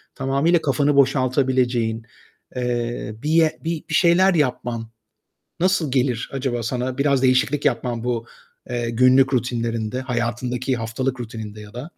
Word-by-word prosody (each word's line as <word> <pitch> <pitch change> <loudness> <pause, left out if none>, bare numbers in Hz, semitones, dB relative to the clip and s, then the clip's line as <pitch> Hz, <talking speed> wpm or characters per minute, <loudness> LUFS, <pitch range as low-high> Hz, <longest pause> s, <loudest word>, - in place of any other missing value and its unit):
tamamıyla 140 +6 +1
kafanı 145 0 +1
boşaltabileceğin, 130 -4 +1 0.5
eee, 120 -3 -2
bir, 160 +1 +3
bir 165 -2 -2
şeyler 185 +2 +4
yapman 120 -5 -1 0.7
nasıl 180 -6 +2
gelir 125 -3 0
acaba 130 -3 -2
sana? 125 +3 -3
Biraz 140 -2 +2
değişiklik 130 +2 +2
yapman 120 -2 -1
bu, 120 -1 -2 0.4
eee, 120 -1 -2
günlük 130 +3 +4
rutinlerinde, 115 -1 -2
hayatındaki 125 0 -2
haftalık 125 +3 -3
rutininde 110 -2 -7
ya 105 +1 -12
da? 135 +8 -7
125 Hz, 120 wpm, -22 LUFS, 120-140 Hz, 0.7 s, şeyler